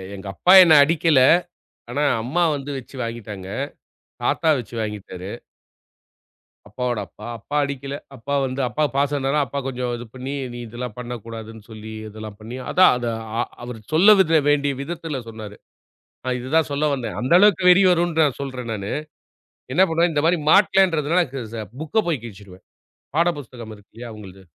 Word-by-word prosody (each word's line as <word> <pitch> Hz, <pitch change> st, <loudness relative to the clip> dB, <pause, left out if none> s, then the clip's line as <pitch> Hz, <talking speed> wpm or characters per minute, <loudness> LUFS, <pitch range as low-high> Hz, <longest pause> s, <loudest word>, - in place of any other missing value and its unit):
எங்க 95 Hz, 0 st, -10 dB
அப்பா 180 Hz, -, +4 dB
என்ன 165 Hz, -3 st, +5 dB
அடிக்கல. 160 Hz, -2 st, +3 dB, 0.7 s
ஆனா, 145 Hz, +4 st, -1 dB, 0.2 s
அம்மா 165 Hz, +9 st, 0 dB
வந்து 140 Hz, 0 st, -6 dB
வச்சு 130 Hz, +1 st, -11 dB
வாங்கிட்டாங்க. 105 Hz, -5 st, -7 dB, 0.8 s
தாத்தா 160 Hz, -, +2 dB
வச்சு 120 Hz, 0 st, -8 dB
வாங்கிட்டாரு. 100 Hz, -3 st, -6 dB, 1.4 s
அப்பாவோட 120 Hz, 0 st, -2 dB
அப்பா. 105 Hz, -, -13 dB
அப்பா 145 Hz, +8 st, -7 dB
அடிக்கல. 140 Hz, 0 st, -4 dB, 0.2 s
அப்பா 140 Hz, +3 st, -3 dB
வந்து, 130 Hz, +1 st, -3 dB
அப்பா 150 Hz, +8 st, -1 dB
பாசம்னால 140 Hz, 0 st, +1 dB
அப்பா 140 Hz, +3 st, -4 dB
கொஞ்சம் 125 Hz, -1 st, -3 dB
இது 120 Hz, -, -8 dB
பண்ணி, 130 Hz, +2 st, -5 dB, 0.2 s
நீ 120 Hz, -, -7 dB
இதெல்லாம் 120 Hz, 0 st, -7 dB
பண்ணக்கூடாதுன்னு 115 Hz, -2 st, -8 dB
சொல்லி 110 Hz, 0 st, -9 dB, 0.2 s
இதெல்லாம் 110 Hz, -1 st, -9 dB
பண்ணி, 115 Hz, +4 st, -8 dB
அதான் 185 Hz, -, +6 dB
அத 120 Hz, -1 st, -3 dB, 0.3 s
ஆ -, -, +3 dB, 0.2 s
அவரு 120 Hz, -2 st, -7 dB
சொல்லவித 185 Hz, -2 st, +6 dB
வேண்டிய 145 Hz, -1 st, +2 dB
விதத்தில 160 Hz, -2 st, -5 dB
சொன்னாரு. 110 Hz, -2 st, -9 dB, 0.7 s
நா 130 Hz, -, -1 dB
இதுதான் 150 Hz, +5 st, +1 dB
சொல்ல 145 Hz, +2 st, 0 dB
வந்தேன். 125 Hz, -3 st, -5 dB
அந்த 125 Hz, -, -1 dB
அளவுக்கு 190 Hz, -3 st, +5 dB
வெறி 185 Hz, +2 st, +6 dB
வருன்ட்டு 170 Hz, -2 st, +2 dB
நா -, -, +4 dB
சொல்றேன் 125 Hz, -4 st, -5 dB
நானு. 100 Hz, -1 st, -5 dB, 0.8 s
என்னா 185 Hz, +7 st, +5 dB
பண்ணுவேன், 165 Hz, +1 st, +2 dB
இந்த 145 Hz, -, 0 dB
மாரி 175 Hz, 0 st, +3 dB
மாட்டலன்றதுனால 180 Hz, -4 st, +4 dB
க 135 Hz, -4 st, -5 dB
ச 110 Hz, -2 st, -4 dB, 0.2 s
புக்க 180 Hz, +8 st, 0 dB
போய் 145 Hz, -9 st, -1 dB
கிழிச்சுடுவேன். 95 Hz, -4 st, -12 dB, 0.5 s
பாட 170 Hz, +1 st, +4 dB
புஸ்தகம் 120 Hz, -4 st, -9 dB
இருக்கு 105 Hz, -, -22 dB
இல்லையா 120 Hz, 0 st, -8 dB
அவுங்களள்து. 95 Hz, -3 st, -12 dB
130 Hz, 155 wpm, -22 LUFS, 115-155 Hz, 1.4 s, அதான்